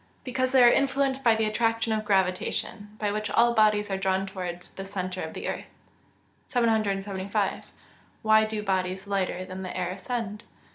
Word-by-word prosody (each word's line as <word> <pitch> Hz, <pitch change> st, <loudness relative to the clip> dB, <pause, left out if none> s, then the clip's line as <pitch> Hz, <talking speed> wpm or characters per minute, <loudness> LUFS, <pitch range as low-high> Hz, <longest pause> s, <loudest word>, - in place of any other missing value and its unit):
_ -, -, -37 dB
Because 255 Hz, 0 st, -1 dB
they 260 Hz, -2 st, +6 dB
are 240 Hz, -, +8 dB
influenced 270 Hz, 0 st, +1 dB
by 230 Hz, -2 st, +5 dB
the 220 Hz, 0 st, +1 dB
attraction 225 Hz, +1 st, +1 dB
of 215 Hz, 0 st, -1 dB
gravitation, 200 Hz, +2 st, -1 dB
by 210 Hz, -1 st, -1 dB
which 215 Hz, 0 st, -2 dB
all 235 Hz, +2 st, +4 dB
bodies 210 Hz, -2 st, +3 dB
are 195 Hz, -, 0 dB
drawn 190 Hz, 0 st, +1 dB
towards 180 Hz, -2 st, -6 dB
the 195 Hz, -, -7 dB
centre 185 Hz, -1 st, -4 dB
of 160 Hz, -, -6 dB
the -, -, -4 dB
earth. -, -, -3 dB, 0.8 s
775. 200 Hz, -5 st, 0 dB, 0.6 s
_Why 220 Hz, 0 st, +5 dB
do 215 Hz, -1 st, -3 dB
bodies 190 Hz, -1 st, -1 dB
lighter 190 Hz, -2 st, -1 dB
than 185 Hz, 0 st, -7 dB
the 185 Hz, -1 st, -5 dB
air 180 Hz, -1 st, -1 dB
ascend? 210 Hz, +1 st, -4 dB
210 Hz, 175 wpm, -27 LUFS, 190-225 Hz, 0.8 s, are